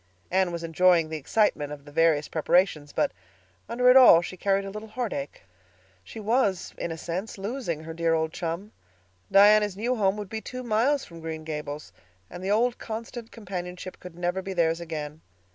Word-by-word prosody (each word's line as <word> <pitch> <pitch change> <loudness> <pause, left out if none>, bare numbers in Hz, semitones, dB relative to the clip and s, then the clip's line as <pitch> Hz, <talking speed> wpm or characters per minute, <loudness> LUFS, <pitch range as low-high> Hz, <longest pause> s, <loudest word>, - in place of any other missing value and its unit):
Anne 185 -1 +2
was 170 -1 -5
enjoying 165 0 +3
the 160 - -3
excitement 150 -2 +1
of 145 -1 -9
the 145 - -12
various 155 -1 +3
preparations, 160 -2 +1
but - - +1 0.6
under 250 +2 +1
it 250 - +8
all 255 -10 +9
she 175 +2 -6
carried 195 +1 0
a 195 - -6
little 215 +2 -8
heartache. 210 - -4 0.6
She 160 - -10
was, 215 -3 0
in 170 - -3
a 165 - -5
sense, 180 +7 -5
losing 195 - -4
her 165 0 -7
dear 165 0 +1
old 160 0 -1
chum; 175 +5 -4 0.6
Diana's 205 0 +6
new 240 +4 0
home 200 -3 +1
would 210 -1 -5
be 220 +3 -5
two 255 +2 -7
miles 245 +5 +1
from 170 -1 -12
Green 160 -1 -5
Gables, 150 -1 -6 0.4
and 180 - -8
the 190 - -2
old 235 +4 +2
constant 230 +1 -7
companionship 180 -4 -7
could 180 -2 -11
never 175 +2 -1
be 190 0 -5
theirs 165 -1 +1
again. 155 -2 -6
185 Hz, 185 wpm, -26 LUFS, 165-215 Hz, 0.6 s, all